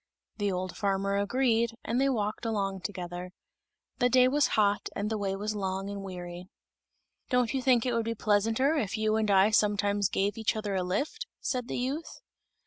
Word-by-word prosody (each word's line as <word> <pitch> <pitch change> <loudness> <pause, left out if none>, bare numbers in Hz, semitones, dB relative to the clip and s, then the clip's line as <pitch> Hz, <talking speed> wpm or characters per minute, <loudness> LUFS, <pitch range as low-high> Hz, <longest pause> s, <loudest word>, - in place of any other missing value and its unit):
The 205 -2 0
old 185 0 -3
farmer 200 -1 0
agreed, 230 +2 +1
and 240 +3 0
they 275 - +3
walked 215 -4 -1
along 200 -4 -1
together. 180 -2 -5 0.7
The 245 0 +4
day 255 +1 +6
was 285 +3 +3
hot, 205 -1 +2
and 210 +2 -2
the 220 - 0
way 195 -1 -1
was 210 +2 -3
long 195 -1 -3
and 200 0 -5
weary. 180 -1 -7 0.8
"Don't 250 -1 +2
you 265 - 0
think 250 -2 +3
it 250 - 0
would 230 -1 0
be 230 0 -2
pleasanter 225 +7 +2
if 220 -5 -1
you 215 0 +1
and 220 -1 +1
I 195 +2 +5
sometimes 205 -1 +2
gave 200 +3 0
each 220 +1 +1
other 210 -2 -3
a 190 - +1
lift?" 285 - -2
said 250 -2 -2
the - - -3
youth. 275 +6 -3
210 Hz, 190 wpm, -29 LUFS, 195-240 Hz, 0.8 s, day